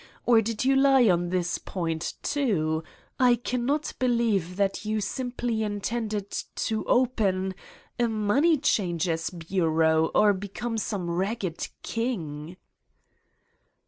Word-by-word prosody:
Or 235 -2 +5
did 225 +2 -2
you 270 +1 +4
lie 270 -3 +5
on 175 -1 +2
this 180 -1 -1
point, 165 -3 -3
too? 165 - 0 0.4
I 250 -2 +5
cannot 250 +5 -1
believe 230 -8 +1
that 195 +1 0
you 215 0 -1
simply 240 +1 -2
intend 215 +2 -2 0.5
to 220 -1 -1
open... 200 -7 +1 0.5
a 240 - +3
money 230 +10 +2
changer's 175 - 0
bureau 160 -2 +1
or 210 -1 +5
become 205 +4 -4
some 195 -3 -3
ragged 190 0 -2 0.2
king!" 175 - -4
205 Hz, 110 wpm, -26 LUFS, 175-240 Hz, 0.5 s, Or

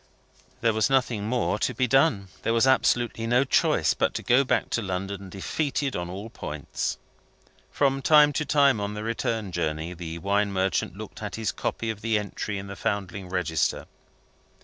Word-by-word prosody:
There 115 -1 +3
was 110 -1 +2
nothing 125 -6 +1
more 120 -3 0
to 130 - -1
be 130 - +2
done; 125 - +3
there 115 - 0
was 115 - +4
absolutely 120 -3 +2
no 120 +3 +4
choice 140 - +2
but - - 0
to - - -3
go 125 +3 +4
back 130 - 0
to 120 - 0
London, 95 0 -4
defeated 135 - -2
at 90 0 -3
all 100 +5 -7
points. 75 -8 -4 0.7
From 135 -1 +1
time 150 0 +6
to 150 - 0
time 140 -6 +3
on 100 +1 -3
the 105 - -5
return 110 -2 -2
journey, 80 0 -2
the 85 -2 -6
wine 100 +4 +1
merchant 95 0 -1
looked - - -9
at - - -4
his 110 -4 -1
copy 115 -1 -3
of 105 -2 -9
the 115 -1 +1
entry 105 0 -4
in 100 - -6
the 100 0 -7
Foundling 95 -2 -3
Register. 85 -4 0
105 Hz, 180 wpm, -26 LUFS, 95-125 Hz, 0.7 s, time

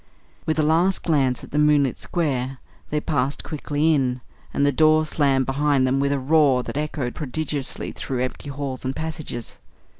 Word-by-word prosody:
With 155 -1 +1
a 155 - +3
last 170 +5 +2
glance 135 -6 +1
at - - -11
the 150 - 0
moonlit 150 -3 +4
square, 135 -6 -2 0.3
they 150 - 0
passed 140 -2 -1
quickly 155 +1 0
in, 130 -3 0 0.3
and 140 - +1
the 145 - +4
door 155 +2 +4
slammed 140 -4 +2
behind 140 0 +2
them 130 +1 +1
with 140 0 +1
a 140 - +1
roar 135 -2 +3
that - - -6
echoed 145 -4 -2
prodigiously 145 -1 -3
through 125 -2 -3
empty 130 +3 -5
halls 140 -2 -5
and 130 +1 -2
passages. 155 -7 -5
145 Hz, 175 wpm, -23 LUFS, 130-155 Hz, 0.3 s, moonlit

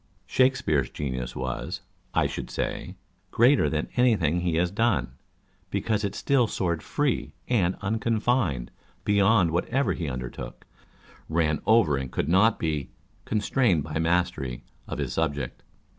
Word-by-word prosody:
Shakespeare's 125 - +2
genius 65 -4 -4
was, 65 0 -4 0.3
I - - +4
should - - -4
say, - - -3 0.3
greater 125 +5 +4
than - - -1
any 125 -2 +5
thing 85 -2 +1
he 85 -2 0
has 90 +2 +1
done, 115 - +1 0.6
because 110 -2 -1
it 100 - -2
still 130 -4 +2
soared 85 -5 -1
free 145 -4 -1
and 95 -7 +1
uncon 110 +2 0
fined 95 - 0 0.3
beyond 100 -3 +4
whatever 115 +5 +1
he 80 -5 -3
undertook 60 -1 -7
â€" - - -32 0.3
ran 80 -2 +1
over 110 -11 +5
and 65 -1 -4
could 70 - -1
not 105 +6 +4
be 75 -4 -2 0.2
" - - -36
constrained 105 - +1
by 75 +1 -3
mastery 80 -7 0
" - - -34
of - - -5
his - - -2
subject. 70 -3 -2
90 Hz, 150 wpm, -26 LUFS, 75-115 Hz, 0.6 s, any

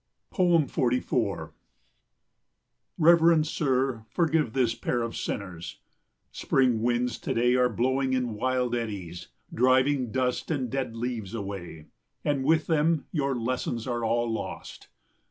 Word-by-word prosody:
44 150 -8 +1 1.4
Reverend 165 -1 +5
sir, 130 -6 0
forgive 160 -7 +1
this 125 -4 +2
pair 120 0 -2
of 115 - -4
sinners. 90 -4 -5 0.5
Spring 125 -4 +1
winds 120 0 0
to - - -3
day 120 +1 +3
are 125 0 +3
blowing 130 +3 0
in 125 -3 0
wild 125 +2 -1
eddies, 100 -8 -4 0.3
driving 130 0 +2
dust 125 +1 -1
and 130 -7 -2
dead 130 -4 -3
leaves 115 -3 -4
away, 95 -7 -6 0.4
and 140 -2 +1
with 160 +2 +3
them 160 0 +1
your 140 -4 0
lessons 120 -1 -2
are 120 -2 -2
all 120 +1 +1
lost. 115 -1 -6
125 Hz, 120 wpm, -27 LUFS, 115-135 Hz, 1.4 s, Reverend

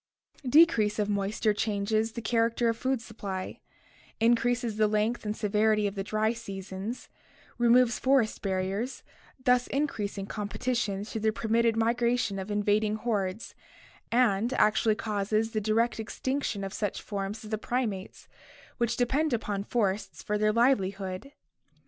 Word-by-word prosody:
Decrease 245 -9 +5
of 210 -1 0
moisture 205 +1 0
changes 215 +1 0
the 235 - -6
character 230 +1 +2
of 230 - 0
the - - -21
food 260 -2 0
supply, 195 -5 -6 0.6
increases 235 0 +2
the 215 -1 +4
length 215 +3 0
and 210 +1 -2
severity 215 0 +2
of 200 - -1
the 195 -1 -3
dry 215 +2 0
seasons, 195 0 -6 0.5
removes 240 -1 +4
forest 260 -4 +2
barriers, 195 +6 -2 0.4
thus 250 0 +4
increasing 210 -9 -2
competition 205 0 -2
through 220 0 -5
the 220 0 +2
permitted 230 +1 +1
migra 235 +2 +2
tion 205 -5 -2
of 190 +2 -6
invading 210 +1 +1
hordes, 210 -2 -2 0.6
and 235 -1 +2
actually 215 -1 +3
causes 215 +1 -1
the 215 - -1
direct 225 +3 +1
extinction 225 -1 -2
of 195 - -5
such 205 -3 -2
forms 200 +1 -4
as 215 - -9
the 215 - -1
primates, 220 -6 -3 0.5
which 235 0 0
depend 275 +4 +1
upon 205 -3 -2
forests 205 -2 -1
for 210 - -1
their 215 0 +2
livelihood. 200 -2 0
215 Hz, 145 wpm, -28 LUFS, 205-235 Hz, 0.6 s, Decrease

